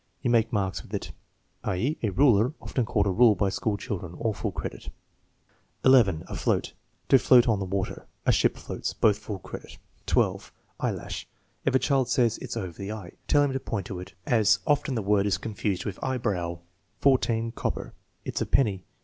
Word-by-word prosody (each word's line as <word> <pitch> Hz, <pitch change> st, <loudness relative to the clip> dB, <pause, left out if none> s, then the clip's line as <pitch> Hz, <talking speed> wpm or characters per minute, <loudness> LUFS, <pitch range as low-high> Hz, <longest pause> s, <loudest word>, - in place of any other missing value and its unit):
"You 120 Hz, -, +2 dB
make 115 Hz, -1 st, +3 dB
marks 95 Hz, -, -1 dB
with -, -, -7 dB
it," -, -, -4 dB, 0.5 s
i.e., 115 Hz, +12 st, 0 dB
a 110 Hz, -, +1 dB
ruler, 120 Hz, +3 st, +4 dB
often 125 Hz, -, -2 dB
called 100 Hz, -2 st, +1 dB
a 100 Hz, -, +2 dB
rule 115 Hz, +2 st, +5 dB
by 100 Hz, +1 st, +1 dB
school 100 Hz, +1 st, -1 dB
children. 90 Hz, -7 st, -5 dB
(All 110 Hz, +2 st, -1 dB
full 105 Hz, 0 st, -3 dB
credit.) 80 Hz, -, -6 dB, 1.0 s
11. 115 Hz, -11 st, +5 dB
Afloat. -, -, -1 dB, 0.4 s
"To 135 Hz, -, +7 dB
float 125 Hz, -1 st, +6 dB
on 110 Hz, -4 st, +2 dB
the 100 Hz, -, -2 dB
water." 95 Hz, 0 st, -3 dB, 0.2 s
"A -, -, +5 dB
ship -, -, +2 dB
floats." -, -, -4 dB
(Both 105 Hz, -2 st, +3 dB
full 105 Hz, -, -5 dB
credit.) 95 Hz, -, -10 dB, 0.3 s
12. -, -, +1 dB, 0.3 s
Eyelash. -, -, -3 dB, 0.4 s
If -, -, +2 dB
the -, -, +6 dB
child 135 Hz, -2 st, +1 dB
says, 120 Hz, -3 st, +2 dB
"It's -, -, -5 dB
over 95 Hz, -6 st, -4 dB
the 100 Hz, +3 st, -5 dB
eye," 105 Hz, -5 st, -7 dB, 0.2 s
tell 145 Hz, -1 st, +4 dB
him 140 Hz, -2 st, 0 dB
to 135 Hz, -, -1 dB
point 105 Hz, -6 st, -4 dB
to 95 Hz, -, -6 dB
it, 90 Hz, -, -9 dB
as 110 Hz, -3 st, +4 dB
often 145 Hz, -2 st, +1 dB
the 110 Hz, -, -1 dB
word 100 Hz, 0 st, +2 dB
is 95 Hz, -, +1 dB
confused 105 Hz, -3 st, -3 dB
with 100 Hz, -3 st, -5 dB
eyebrow. 100 Hz, -10 st, -1 dB, 0.4 s
14. 115 Hz, -4 st, +2 dB
Copper, -, -, -4 dB, 0.3 s
"It's -, -, -3 dB
a -, -, -1 dB
penny." 100 Hz, -9 st, +2 dB
110 Hz, 190 wpm, -27 LUFS, 95-125 Hz, 1.0 s, To